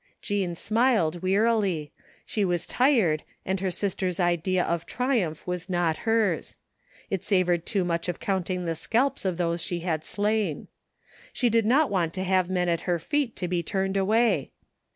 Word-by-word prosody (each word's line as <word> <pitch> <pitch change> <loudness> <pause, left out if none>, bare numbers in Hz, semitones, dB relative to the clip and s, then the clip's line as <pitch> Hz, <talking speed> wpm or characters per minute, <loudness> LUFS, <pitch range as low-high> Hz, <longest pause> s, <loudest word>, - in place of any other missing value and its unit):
Jean 195 -4 -2
smiled 215 -6 +1
wearily. 195 -5 +1 0.3
She 210 - -1
was 175 -3 0
tired 225 - +3 0.2
and 190 0 -1
her 190 0 -1
sister's 185 -1 -2
idea 175 +1 +1
of 170 -1 -2
triumph 235 - -1
was 180 0 -4
not 175 -3 +1
hers. 215 -7 +1 0.6
It 195 -3 -1
savored 180 -4 +1
too 200 -4 +1
much 170 0 -1
of 175 - -3
counting 185 -2 -1
the 165 - 0
scalps 230 - 0
of 185 -3 0
those 170 -1 0
she 175 0 -3
had 160 -3 -1
slain. 205 -5 -1 0.6
She 245 -3 +1
did 225 -1 +3
not 275 +3 +3
want 175 -4 0
to 185 - -2
have 185 -1 +2
men 180 -1 0
at 170 -1 +1
her 175 - +3
feet 265 - -1
to 180 - -3
be 175 -1 0
turned 190 +3 -2
away. 220 +5 +2
185 Hz, 170 wpm, -26 LUFS, 175-210 Hz, 0.6 s, tired